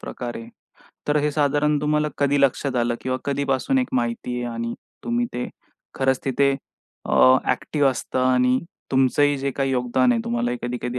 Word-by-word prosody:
प्रकार 120 -1 -6
आहे. 115 0 -9 0.6
तर 150 - +3
हे 150 - +1
साधारण 145 0 +1
तुम्हाला 150 +1 +1
कधी 145 0 +2
लक्षात 140 -1 +1
आलं 120 0 +1
किंवा 130 0 -2
कधीपासून 140 - 0
एक 255 - 0
माहिती 120 0 -1
आहे 120 -1 -3
आणि 115 0 -3 0.3
तुम्ही 240 +1 0
ते 125 - -3 0.5
खरंच 130 -1 +1
तिथे 140 +1 +2 0.6
अ, 130 0 +6 0.2
एक्टिव्ह 145 -3 +1
असतं 130 - -4
आणि 125 0 +3 0.3
तुमचंही 140 +2 +3
जे 140 +1 -1
काही 135 0 -1
योगदान 125 0 +2
आहे 115 - 0
तुम्हाला 120 +1 -1
कधी-कधी 125 0 -3
130 Hz, 165 wpm, -23 LUFS, 125-145 Hz, 0.6 s, अ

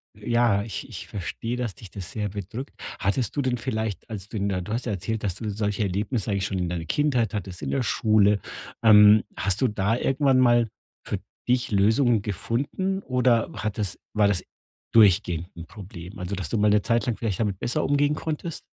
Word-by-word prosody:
ja, 120 -4 +2
ich 110 - -6
ich - - -8
verstehe, 115 +5 -4
dass 120 -6 -3
dich 105 - -12
das 95 -2 -7
sehr 105 -2 -2
bedrückt. 105 +7 -7 0.2
Hattest 105 +2 0
du 145 - +1
denn 130 -2 0
vielleicht, 110 -4 -3
als 100 -3 -6
du 110 - -5
in 100 0 0
der 95 -2 -1
du 105 +5 -5
hast 120 +2 -2
ja 120 - -1
erzählt, 110 +4 -3
dass 95 -4 -1
du 110 +1 -4
solche 105 0 -1
Erlebnisse 105 +3 -1
eigentlich 100 -1 0
schon 95 -2 -2
in 90 -1 -1
deiner 85 -2 -3
Kindheit 125 - +1
hattest, 95 -4 -5
in - - -3
der 135 - 0
Schule, 105 -3 +3 0.4
ähm. 105 -1 +8
Hast 100 +2 -1
du 130 - +4
da 105 +1 0
irgendwann 135 0 +2
mal 120 -2 +4 0.4
für - - -2 0.3
dich 125 -1 +1
Lösungen 110 +3 +3
gefunden 135 - -2
oder 125 -3 +2
hat 110 +1 -3
es 100 -2 -2 0.2
war 105 -1 +4
das 100 -3 +1 0.5
durchgehend 90 -6 +4
'n 85 - -7
Problem? 90 -1 -10
Also, 90 +2 -3
dass 90 -5 -4
du - - 0
mal 105 0 +4
'ne 105 0 +4
Zeit 115 0 +1
lang 120 -3 -1
vielleicht 105 -6 -2
damit 100 -4 -1
besser 120 - -1
umgehen 145 +1 +2
konntest? 160 +1 -4
105 Hz, 205 wpm, -25 LUFS, 100-120 Hz, 0.5 s, ähm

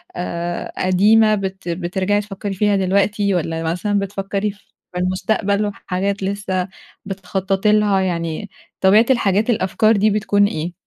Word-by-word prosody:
آآ 175 0 -4
قديمة 215 +4 +4
بت 190 -2 -5
بترجَعي 185 +4 -1
تفكّري 200 0 -6
فيها 205 +1 +2
دلوقتي، 200 +1 +1
والّا 165 -1 -2
مثلًا 200 +5 0
بتفكّري 200 +1 -2
في 205 +2 -22 0.3
المستقبل 200 +3 0
وحاجات 200 0 -3
لسه 190 -2 -2 0.4
بتخطّطي 195 +1 -1
لها، 210 -2 +3
يعني 170 +1 -3 0.3
طبيعة 205 +4 +6
الحاجات 215 -3 +2
الأفكار 215 +1 +2
دي 215 +2 +3
بتكون 205 -1 +2
إيه؟ 165 -1 -4
195 Hz, 125 wpm, -19 LUFS, 185-205 Hz, 0.4 s, طبيعة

